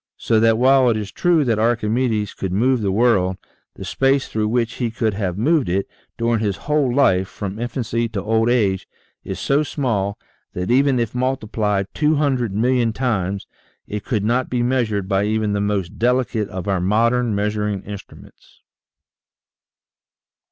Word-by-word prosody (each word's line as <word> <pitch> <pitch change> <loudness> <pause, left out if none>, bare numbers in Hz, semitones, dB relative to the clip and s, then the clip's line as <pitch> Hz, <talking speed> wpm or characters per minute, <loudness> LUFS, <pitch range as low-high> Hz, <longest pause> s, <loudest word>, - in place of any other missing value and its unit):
So 110 - +1
that 115 0 +4
while 130 +1 +5
it 115 - +1
is 105 -2 -5
true 170 -4 +2
that 115 -3 +1
Archimedes 115 -1 0
could 95 - -4
move 120 +5 +2
the 100 -2 0
world, 95 -4 +2 0.4
the - - -8
space 135 0 +1
through 110 -1 -1
which 115 +1 0
he 120 -2 -1
could 110 -1 -1
have 95 -3 -3
moved 140 - +2
it, 95 +2 0 0.3
during 115 -1 +1
his 105 -3 -1
whole 150 -4 +1
life, 95 -9 +3
from 100 +1 -6
infancy 120 -1 -2
to 105 -3 -4
old 110 +2 +1
age, 100 -6 +1 0.4
is - - -5
so 140 +2 +2
small 110 -10 -1 0.4
that 90 +4 -2
even 135 +1 +3
if 115 -2 -2
multiplied 110 -6 -1
two 155 0 +2
hundred 135 -7 0
million 120 +2 +1
times 100 -6 -1 0.4
it 105 -1 -5
could 110 -6 -1
not 120 +3 +1
be 125 -1 0
measured 115 -6 0
by 95 0 +1
even 110 -1 0
the 100 - 0
most 100 -2 -2
delicate 120 -3 +1
of 95 0 -6
our 95 -3 0
modern 115 +4 +2
measuring 105 -1 -1
instruments. 100 -1 -12
110 Hz, 165 wpm, -20 LUFS, 100-125 Hz, 0.4 s, while